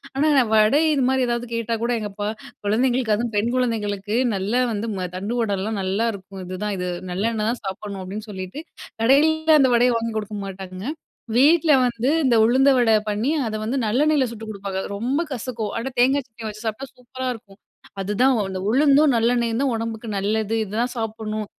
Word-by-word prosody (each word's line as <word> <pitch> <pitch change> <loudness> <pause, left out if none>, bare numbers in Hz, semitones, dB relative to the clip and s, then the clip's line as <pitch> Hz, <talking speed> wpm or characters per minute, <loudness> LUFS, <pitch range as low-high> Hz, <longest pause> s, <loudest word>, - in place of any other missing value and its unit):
ஆனா 285 +3 +2
நான் 240 -5 +3
வடை, 215 +8 +5
இது 275 -3 +1
மாதிரி 265 -1 +2
ஏதாவது 240 0 -2
கேட்டா 230 0 -1
கூட 240 - 0
எங்க 210 - -4
அப்பா, 205 0 -3 0.4
குழந்தைங்களுக்கு 240 +1 +2
அதுவும் 230 +1 -3
பெண் 225 +3 +1
குழந்தைங்களுக்கு 215 -3 -1 0.2
நல்லா 210 +6 0
வந்து 220 +2 -3
மு 185 - -3
தண்டுவடலாம் 210 -1 -2
நல்லா 195 +5 0
இருக்கும். 195 0 -10
இதுதான் 195 +3 -3
இது 180 0 -2 0.2
நல்லெண்ணெய் 215 +3 -1
தான் 240 - -6
சாப்பட்ணும் 195 0 -5
அப்டின்னு 210 +4 -7
சொல்லிட்டு. 190 +8 -6 0.4
கடையிலலாம் 315 +4 +4
அந்த 260 -2 +4
வடையை 245 +1 +4
வாங்கி 230 -1 -3
கொடுக்க 210 0 -4
மாட்டாங்க. 185 -1 -8 0.5
வீட்ல 315 +4 +5
வந்து 240 +1 0
இந்த 250 -4 +3
உளுந்த 260 +5 +4
வடை 235 -3 +4 0.2
பண்ணி, 215 +8 0 0.2
அத 215 - -3
வந்து 240 +5 -1
நல்லெண்ணெயில 285 +5 +2
சுட்டுக் 225 -1 -8
கொடுப்பாங்க. 195 -2 -5 0.2
ரொம்ப 255 +9 -1
கசக்கும். 230 -4 -4
ஆனா 235 +4 -3
தேங்காய் 270 +3 +3
சட்னிய 225 -1 -8
வச்சு 215 +2 -10
சாப்பிட்டா 220 +5 -4
சூப்பரா 255 +1 -7
இருக்கும். 205 -3 -15 0.4
அதுதான் 210 +7 +2 0.2
அந்த 190 -1 -4
உளுந்தும், 280 +3 +4
நல்லெண்ணெயும் 235 +1 +1
தான் 265 -4 +1
உடம்புக்கு 225 0 -4
நல்லது. 215 +2 0
இதான் 230 +5 -2
சாப்பிட்ணும். 215 -1 -3
225 Hz, 170 wpm, -22 LUFS, 210-250 Hz, 0.5 s, வடை